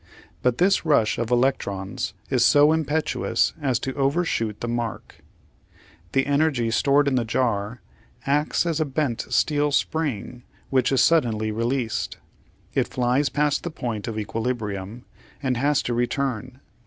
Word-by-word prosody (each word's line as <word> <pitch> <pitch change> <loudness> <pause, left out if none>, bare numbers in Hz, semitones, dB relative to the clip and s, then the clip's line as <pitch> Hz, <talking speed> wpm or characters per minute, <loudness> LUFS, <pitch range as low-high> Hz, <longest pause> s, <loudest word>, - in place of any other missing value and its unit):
But 125 -1 +1
this 195 +2 +3
rush 145 -9 +2
of 115 -1 -2
electrons 120 -6 -1 0.2
is - - +3
so 145 +1 +6
impetuous 160 0 0
as 130 -4 +1
to 135 - -3
overshoot 135 - 0
the 120 - -4
mark. 120 -2 -4 0.9
The 135 - +2
energy 140 -5 +1
stored 140 +4 +3
in 140 - +2
the 125 -2 +2
jar 115 -1 -1 0.4
acts 145 +4 +1
as 165 -2 0
a 155 - +2
bent 135 -4 -2
steel 145 -1 +2
spring 140 -6 -1 0.3
which 130 -1 +2
is 135 - +3
suddenly 115 -10 +2
released. 115 +1 -2 0.6
It - - +1
flies 130 +3 +1
past 150 -1 +1
the 175 - -4
point 120 -9 -4
of 110 -2 -4
equilibrium 110 -1 -4 0.4
and 130 -2 +1
has 145 +3 +2
to 120 - -2
return. 125 +1 -2
130 Hz, 140 wpm, -24 LUFS, 115-145 Hz, 0.9 s, so